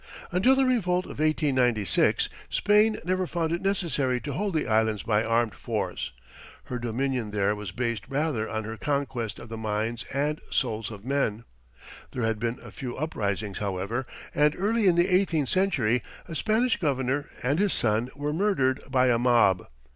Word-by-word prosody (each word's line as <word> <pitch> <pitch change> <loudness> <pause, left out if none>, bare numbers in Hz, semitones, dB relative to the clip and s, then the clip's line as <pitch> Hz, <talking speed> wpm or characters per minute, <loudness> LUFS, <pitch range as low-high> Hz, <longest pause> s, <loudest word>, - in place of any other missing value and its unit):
Until 195 +10 +4
the 270 0 +3
revolt 185 -8 +1
of - - -9
1896, 130 - +2 0.2
Spain 210 +1 +3
never 185 0 0
found 165 -2 -1
it 170 - -1
necessary 160 -10 0
to 145 - -4
hold 195 +4 -2
the 155 - +1
Islands 110 -2 +1
by 110 -1 +2
armed 115 -1 +1
force; 95 - -3 0.5
her 125 - -5
dominion 120 0 -1
there 105 0 +1
was 105 -3 -6
based 115 0 -2
rather 140 -6 -1
on 110 0 -2
her 110 +1 -6
conquest 135 -6 -2
of - - -10
the 115 - -5
minds 110 +2 -2
and 145 +3 -1
souls 115 -5 -1
of 105 -1 -10
men. 125 -5 0 0.7
There 125 - -2
had 115 -1 0
been 115 +2 -1
a - - -10
few 125 -2 -6
uprisings, 105 -9 -2
however, 100 +6 -2 0.3
and 150 0 +3
early 215 +2 +2
in 175 - +5
the 175 +1 +4
eighteenth 180 -7 +2
century 135 - +2 0.3
a 170 - -7
Spanish 220 - +2
governor 140 -3 0
and 140 +6 +1
his 205 -1 +3
son 110 +2 +1
were 145 +1 -2
murdered 155 -8 +1
by 130 -1 +3
a 120 -1 +3
mob. 115 -7 +3
130 Hz, 170 wpm, -27 LUFS, 110-165 Hz, 0.7 s, in